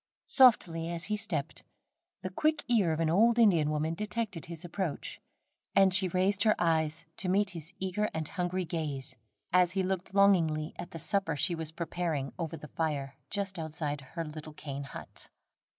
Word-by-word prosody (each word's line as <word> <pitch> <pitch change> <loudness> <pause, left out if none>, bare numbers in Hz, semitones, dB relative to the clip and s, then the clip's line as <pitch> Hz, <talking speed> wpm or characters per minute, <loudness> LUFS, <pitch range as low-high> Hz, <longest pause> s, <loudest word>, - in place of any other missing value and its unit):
Softly 170 - +4
as 170 0 -2
he 210 - 0
stepped, 180 -9 -2 0.6
the 185 - -3
quick 310 +9 +1
ear 215 -9 +3
of 160 - -1
an 165 -1 +2
old 230 +6 +4
Indian 175 -10 +5
woman 155 +1 0
detected 210 -2 -3
his 170 0 -7
approach, 175 -2 -4 0.5
and 195 -1 +6
she 190 0 +5
raised 190 +3 +1
her 215 0 +5
eyes 160 -1 +1
to 185 - 0
meet 200 +1 +2
his 165 -1 -5
eager 190 +3 -1
and 160 -1 -3
hungry 180 +1 -2
gaze, 145 -5 -3 0.4
as 180 -1 +4
he 190 -1 +1
looked 190 0 -3
longingly 165 -6 +3
at 175 - -5
the 170 - -7
supper 180 -1 0
she 170 +5 +1
was 160 -2 -3
preparing 165 -4 -2
over 165 -1 -3
the 150 0 -11
fire 145 -4 -2 0.2
just 195 -3 -2
outside 150 -2 -3
her 165 -1 -2
little 155 0 -8
cane 140 -2 -6
hut. - - -8
170 Hz, 175 wpm, -31 LUFS, 155-195 Hz, 0.6 s, and